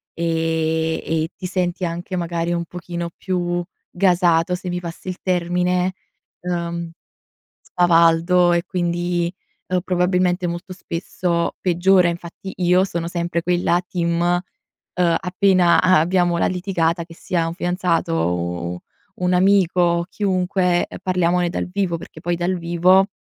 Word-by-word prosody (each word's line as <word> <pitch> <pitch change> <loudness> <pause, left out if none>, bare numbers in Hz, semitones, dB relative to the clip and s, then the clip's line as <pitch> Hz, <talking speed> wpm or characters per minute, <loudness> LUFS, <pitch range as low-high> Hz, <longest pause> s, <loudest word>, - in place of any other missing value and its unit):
e 160 -1 0
e 160 0 -1
ti - - -8
senti 180 0 -1
anche, 175 +2 -4
magari, 170 -1 -2
un 170 0 -2
pochino 175 0 -6
più 175 -2 -2 0.3
gasato, 175 -2 +2
se 180 0 -6
mi 180 0 -2
passi 170 +1 -9
il 180 - -4
termine, 180 0 0 0.5
ehm, 170 -1 -3 0.7
spavaldo, 175 0 +3
e 170 0 +1
quindi, 175 -1 -1 0.4
ehm, 185 0 +1
probabilmente 180 0 +1
molto 175 +3 -6
spesso 170 -1 -2
peggiora. 180 0 +3
Infatti, 170 +2 -6
io 180 0 +3
sono 170 -3 -3
sempre 170 0 -2
quella 175 0 +2
team: 170 -2 -1 0.7
ehm, 175 -2 +2
appena 180 -1 +3
a 185 -3 +5
abbiamo 175 +1 +2
la - - +2
litigata, 175 -2 -1
che 165 0 -14
sia 170 0 -1
un 165 - -4
fidanzato, 175 - 0
o 85 +1 -1
u - - -4 0.4
u 180 - -4
un 180 - +2
amico 185 -1 +3
o 170 -1 +2
chiunque, 185 -2 +1
ehm, - - -9
parliamone 180 -1 +1
dal - - -3
vivo, 185 -3 0
perché - - -12
poi 175 0 -1
dal 175 +2 -1
vivo, 175 +3 +4
175 Hz, 140 wpm, -21 LUFS, 170-180 Hz, 0.7 s, a